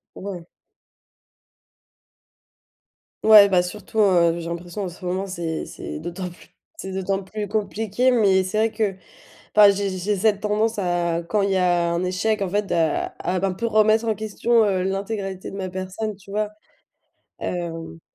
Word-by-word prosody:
Ouais. 185 -3 -7 2.8
Ouais 210 -2 +9
bah 180 -2 +3
surtout, 205 +4 -8
heu, 170 -4 +4
j'ai 170 - -6
l'impression 175 +3 -5
en 185 - -3
ce 180 - -14
moment 185 +2 -2
c'est 170 -4 -4
c'est - - -7
d'autant 175 +3 -5
plus, 175 - -17 0.3
c'est 190 - -6
d'autant 195 +1 -2
plus 210 +2 -5
compliqué. 215 +4 0
Mais 200 -6 +4
c'est 190 +3 -2
vrai - - -8
que, 215 -3 -1 0.6
enfin 210 -1 +9
j'ai 200 0 -1
j'ai 200 +2 -1
cette 205 0 +2
tendance 215 +1 0
à, 175 -3 0
quand 210 +5 0
il 195 0 +1
y - - +2
a 175 -2 +2
un 170 +1 -1
échec, 200 +4 0
en 195 - 0
fait, 205 +1 -1
à 160 -3 +1
à 185 +1 -1
un 190 - 0
peu 230 +5 -2
remettre 215 0 +4
en 220 -2 0
question, 220 +2 +1
heu, 190 -2 +1
l'intégralité 195 0 -3
de - - -9
ma 190 -1 -4
personne, 190 +3 -4
tu 200 0 -18
vois? 210 +1 -1 0.9
Hem 165 -2 -5
195 Hz, 170 wpm, -23 LUFS, 180-210 Hz, 2.8 s, Ouais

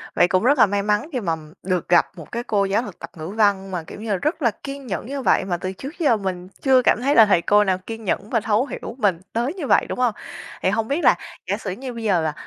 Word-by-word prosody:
Vậy 175 - +5
cũng 185 +2 +1
rất 280 +4 +4
là - - +8
may 200 0 -1
mắn 210 +8 0
khi 255 - 0
mà 170 -7 -1 0.3
được 180 -3 -1
gặp 175 - +5
một 160 - -11
cái 235 0 -3
cô 205 -4 +1
giáo 195 +4 +1
thực 205 -7 -9
tập 170 - -8
Ngữ 155 +1 -6
Văn 200 -2 +1
mà, 175 -3 -3
kiểu 185 - -10
như 220 - -6
là, - - +2
rất 305 - -2
là 235 - +3
kiên 275 -1 -7
nhẫn 195 0 -3
như 275 +1 -4
vậy, - - +2
mà 175 -2 -1
từ 185 +2 -4
trước 275 - -9
giờ 260 -9 +3
mình 185 -2 -4
chưa 260 -2 +5
cảm 235 - +2
thấy 280 +3 +2
là 225 - +9
thầy 195 -5 +3
cô 210 +3 +4
nào 190 -2 +1
kiên 225 +4 -8
nhẫn 200 +1 -2
và 230 - +2
thấu 220 +3 +1
hiểu 240 - -7
mình 200 -8 +1
tới 240 +7 -1
như 330 -8 -5
vậy, - - +4
đúng - - -4
hông? 245 -4 +2 0.5
Thì - - +2
hông 220 +3 0
biết 290 +7 -1
là - - +6 0.3
giả - - 0
sử 195 - -5
như 250 +6 -6
bây 230 -1 -7
giờ, 185 -7 +2
à, 155 - -1
210 Hz, 295 wpm, -22 LUFS, 185-250 Hz, 0.5 s, là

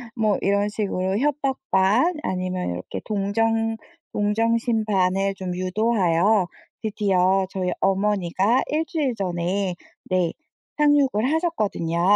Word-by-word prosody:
뭐 215 -3 +2
이런 200 +1 +1
식으로 195 -2 -1
협박 275 +1 0
반 210 - +3
아니면 185 - -2
이렇게 90 +2 -5
동정 225 +2 0 0.4
동정심 225 +2 +1
반을 195 -1 +1
좀 185 -2 -4
유도하여 185 -1 +2 0.3
드디어 195 -3 +2
저희 185 -2 -2
어머니가 195 +3 +2
1 315 +2 0
주일에 300 -9 -1
전에 180 0 -1 0.3
네 180 -3 +1 0.5
상륙을 285 -5 +3
하셨거든요. 210 - -1
200 Hz, 245 characters per minute, -23 LUFS, 185-225 Hz, 0.5 s, 반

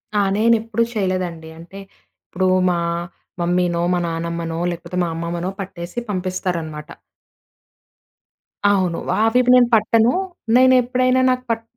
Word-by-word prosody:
ఆ! - - +3 0.2
నేనెప్పుడూ 225 0 +2
చేయలేదండి. 185 -5 -3
అంటే 175 +4 -11 0.5
ఇప్పుడు 185 +1 -1 0.2
మా 175 -1 0 0.6
మమ్మీనో, 175 0 0
మా 180 - +1
నానమ్మనో, 165 0 -4
లేకపోతే 175 +1 -7
మా 170 - -1
అమ్మమ్మనో, 170 +2 -3
పట్టేసి 180 +2 -6
పంపిస్తారనమాట. 180 -5 -4 1.8
అవును. 185 -4 0 0.3
అవివి 245 +2 +2
నేను 245 -1 +5
పట్టను. 225 +2 +3 0.4
నేను 260 0 +6
ఎప్పుడైనా 255 +1 +1
నాకు 255 0 -2
పట్ 225 0 -2
185 Hz, 110 wpm, -20 LUFS, 170-225 Hz, 1.8 s, నేను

